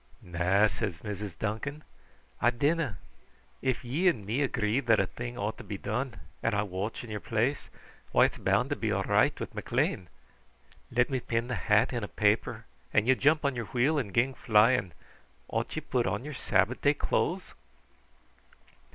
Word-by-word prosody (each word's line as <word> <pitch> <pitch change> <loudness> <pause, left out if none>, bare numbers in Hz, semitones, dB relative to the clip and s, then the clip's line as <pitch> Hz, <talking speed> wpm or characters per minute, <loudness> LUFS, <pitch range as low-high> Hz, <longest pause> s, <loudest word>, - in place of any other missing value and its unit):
"Na," 90 +4 +2
said 105 -2 -1
Mrs. 105 -3 -5
Duncan; 140 +8 -3 0.6
"I 120 - +5
dinna. 140 - 0 0.6
If 130 -2 -1
ye 150 +10 +1
and 115 - +2
me 115 +8 -1
agree 120 -3 +1
that 115 -5 +3
a 95 - +3
thing 120 +5 -7
ought 105 +2 -3
to - - -8
be 100 -1 -5
done, 120 +6 -3 0.3
and 115 - +1
I 105 - +2
watch 100 +4 -4
in 115 - -9
your 105 - -3
place, 120 +7 -1 0.4
why, - - +6
it's - - -3
bound - - +1
to - - +2
be - - -1
all - - 0
right - - +2
with - - -5
McLean. 90 - -1 0.8
Let 125 +2 +1
me 130 - +1
pin 115 0 -2
the - - -1
hat 110 +2 +2
in 120 -3 -2
a - - -2
paper, 110 +2 +1 0.3
and 105 +2 +2
ye 130 - +7
jump 150 +3 +2
on 140 -2 +1
your 120 -1 -3
wheel 135 +7 +1
and 110 -8 -4
gang 125 +6 +2
flying. 110 -4 +3 0.6
Ought - - -2
ye - - -2
put 125 -2 0
on 130 - -2
your 150 - -5
Sabbath 105 0 +1
day 145 +1 +4
clothes?" 180 +5 -1
115 Hz, 185 wpm, -29 LUFS, 105-130 Hz, 0.8 s, ye